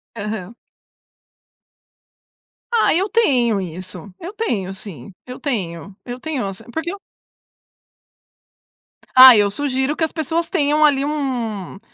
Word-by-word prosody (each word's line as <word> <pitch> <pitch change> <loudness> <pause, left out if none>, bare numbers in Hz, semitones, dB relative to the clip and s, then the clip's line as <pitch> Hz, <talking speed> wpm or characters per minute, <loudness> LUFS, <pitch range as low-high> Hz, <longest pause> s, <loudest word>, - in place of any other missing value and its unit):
Aham. 210 -1 -5 2.2
Ah, 465 - +3
eu 380 +5 0
tenho 250 - +2
isso. 185 +1 -7
Eu 365 +5 -8
tenho 205 - -2
sim. 190 - -10
Eu 250 0 -9
tenho. 190 - -4
Eu 245 0 -6
tenho 285 -7 -3
ass 195 +2 -6
porque 320 +4 -3
eu 400 - -8 2.2
Ah, 255 -1 +11
eu 205 -1 +3
sugiro 265 +4 -1
que - - -2
as 320 - 0
pessoas 325 +2 -2
tenham 305 -3 +2
ali 275 -2 +2
um 245 - -3
250 Hz, 120 wpm, -20 LUFS, 200-305 Hz, 2.2 s, Ah